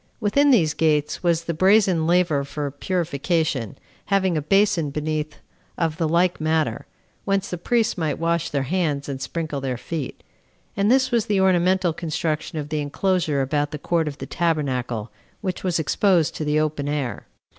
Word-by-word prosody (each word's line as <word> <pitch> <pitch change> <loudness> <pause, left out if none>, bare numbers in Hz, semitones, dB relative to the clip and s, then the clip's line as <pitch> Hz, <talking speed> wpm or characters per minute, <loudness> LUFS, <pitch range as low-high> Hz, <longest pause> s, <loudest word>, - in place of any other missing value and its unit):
Within 280 +7 +3
these 170 - +4
gates 150 -2 +1
was 170 -2 +1
the 170 - -2
brazen 185 -2 +3
laver 170 -5 +2
for 145 0 -4
purification, 155 - -1 0.3
having 190 -3 +1
a 155 - 0
basin 195 -2 +2
beneath 150 +1 -3 0.4
of 165 -2 -1
the 160 -2 +1
like 175 +1 +2
matter, 155 0 0 0.4
whence 195 0 -1
the 180 - -2
priests 230 +1 +1
might 160 -2 -1
wash 170 0 0
their 140 -2 -1
hands 150 -2 -1
and 135 -2 -5
sprinkle 155 -1 -3
their 130 -2 -2
feet; 150 +1 -5 0.5
and 200 +1 +2
this 260 +1 +3
was 235 -3 +1
the 205 -2 +2
ornamental 185 -1 +3
construction 160 -1 -3
of 150 -1 -4
the 155 -1 -1
enclosure 155 -1 0
about 145 +2 0
the 150 - -5
court 165 +1 0
of 145 -1 -5
the - - -6
tabernacle, 130 - -1 0.3
which 185 -4 -3
was 180 -3 +1
exposed 170 +1 +2
to - - -4
the 150 0 +1
open 150 -2 -1
air. 145 -5 -3
160 Hz, 170 wpm, -23 LUFS, 150-185 Hz, 0.5 s, these